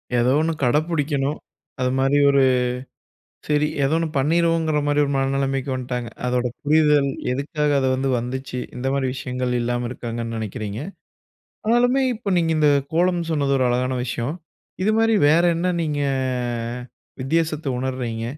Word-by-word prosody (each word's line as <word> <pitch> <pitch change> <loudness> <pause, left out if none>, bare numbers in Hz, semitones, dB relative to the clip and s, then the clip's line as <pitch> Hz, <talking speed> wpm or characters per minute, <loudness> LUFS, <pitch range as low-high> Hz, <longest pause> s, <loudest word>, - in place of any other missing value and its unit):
ஏதோ 120 +2 +3
ஒன்னு 165 +1 0
கட 125 +4 +3
பிடிக்கணும். 145 -2 0 0.4
அதுமாதிரி 135 +2 +2
ஒரு 140 0 +4 1.1
சரி 150 0 +2 0.2
ஏதோ 135 +3 +1
ஒன்னு 165 0 0
பண்ணிருவோங்கிற 160 +1 +2
மாதிரி 145 0 +2
ஒரு 140 - -2
மனநிலைமைக்கு 135 0 0
வந்துட்டாங்க. 125 -2 -4 0.2
அதோட 125 0 0 0.2
புரிதல் 150 -2 +3 0.2
எதுக்காக 145 +2 -1
அது 130 - +1
வந்து 135 +1 -1
வந்துச்சு? 125 +1 -5 0.2
இந்த 125 +2 -3
மாதிரி 135 -1 0
விஷயங்கள் 125 -1 -3
இல்லாம 120 0 -1
இருக்காங்கன்னு 115 -2 -5
நினைக்கிறீங்க. 110 -1 -5 0.9
ஆனாலுமே 245 +4 +3
இப்போ 215 -2 -7
நீங்க 165 -1 +1
இந்த 150 -1 +4 0.2
கோலம் 175 +1 +2
சொன்னது 140 -3 +1
ஒரு 130 - +2
அழகான 130 +1 0
விஷயம். 125 +4 -3 0.5
இதுமாதிரி 225 +2 +3
வேற 160 +3 +5
என்ன 180 +2 0
நீங்க 150 -2 -2 1.2
வித்தியாசத்தை 155 +1 -1
உணர்றீங்க? 125 -3 -3
140 Hz, 135 wpm, -22 LUFS, 125-160 Hz, 1.2 s, வேற